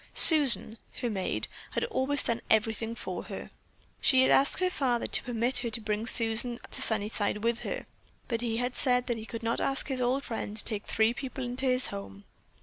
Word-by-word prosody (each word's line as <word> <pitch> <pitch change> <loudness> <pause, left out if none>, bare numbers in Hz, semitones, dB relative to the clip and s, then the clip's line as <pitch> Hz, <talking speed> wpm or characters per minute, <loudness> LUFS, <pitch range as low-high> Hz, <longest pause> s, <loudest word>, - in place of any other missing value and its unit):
Susan, 270 -8 +7 0.2
her 240 -3 -2
maid, 190 -3 -3 0.3
had - - -2
always 285 - -1
done 235 0 -2
everything 225 +1 0
for - - -6
her. - - -9 0.5
She 260 -1 +4
had - - +2
asked 275 - +4
her 365 0 0
father 250 -7 -1
to - - +3
permit 245 0 0
her 240 -1 -2
to 225 - -3
bring 215 +1 -3
Susan 235 0 +2
to - - +3
Sunnyside 210 -1 +1
with 235 0 0
her, - - -6 0.4
but 230 -3 -2
he 230 -2 -2
had 245 +1 -3
said 250 -2 0
that 240 -2 -3
he 220 - -10
could 230 0 -7
not 230 +1 -2
ask 275 +1 -1
his 260 -2 -1
old 255 +3 0
friend 220 -2 -6
to - - +3
take 210 -2 -3
three 220 +1 +1
people 265 0 -7
into 250 +2 -3
his 255 0 -1
home. 100 0 -9
235 Hz, 205 wpm, -28 LUFS, 220-260 Hz, 0.5 s, Susan